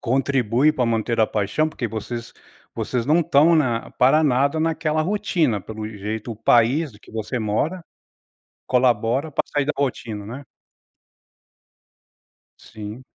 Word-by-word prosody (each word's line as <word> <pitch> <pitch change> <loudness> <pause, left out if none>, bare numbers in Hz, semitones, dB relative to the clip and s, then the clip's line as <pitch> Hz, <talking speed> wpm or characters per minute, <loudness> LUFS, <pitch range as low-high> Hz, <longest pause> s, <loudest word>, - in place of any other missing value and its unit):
contribui 130 +1 +2
pra 130 -5 0
manter 115 0 0
a 110 - +5
paixão? 105 +11 0
Porque 130 -6 -4
vocês 115 +2 -6 0.4
vocês 125 -1 -2
não 160 +3 +4
estão 160 +1 +4
na 130 -7 0
para 135 +5 +4
nada 140 +3 +2
naquela 155 -1 0
rotina, 170 - 0
pelo 110 +2 -7
jeito 110 +2 -5
o - - -11
país 120 +6 +3
de 105 - -17
que - - -17
você 110 +2 -3
mora, 145 - -1 0.8
colabora 125 +3 +1
para - - 0
sair 145 -1 +1
da 150 - -1
rotina, 115 -6 -3
né? 125 +7 -8 2.2
Sim. 110 +3 -9
125 Hz, 135 wpm, -22 LUFS, 110-150 Hz, 2.2 s, a